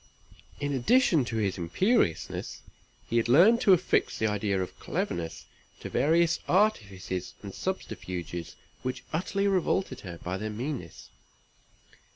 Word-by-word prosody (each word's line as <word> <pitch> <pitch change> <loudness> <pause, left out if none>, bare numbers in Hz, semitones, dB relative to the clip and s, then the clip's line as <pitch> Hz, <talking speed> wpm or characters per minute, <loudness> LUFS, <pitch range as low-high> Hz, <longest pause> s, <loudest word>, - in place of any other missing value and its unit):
In 145 0 -1
addition 160 - +3
to 115 - -4
his 100 -4 -1
imperiousness, 85 - 0 0.4
he 115 - 0
had 115 0 +1
learned 195 - +6
to 195 - +6
affix 180 0 +2
the 110 - 0
idea 105 -2 0
of 95 - -5
cleverness 85 -1 -3 0.4
to - - -6
various 165 +3 +3
artifices 100 - 0
and 100 -1 -7
subterfuges 90 - -5 0.3
which 130 0 -4
utterly 195 +4 0
revolted 185 -7 0
her 85 -3 -8
by 90 +2 -4
their 110 +2 -4
meanness. 115 - -6
120 Hz, 130 wpm, -28 LUFS, -, 0.4 s, learned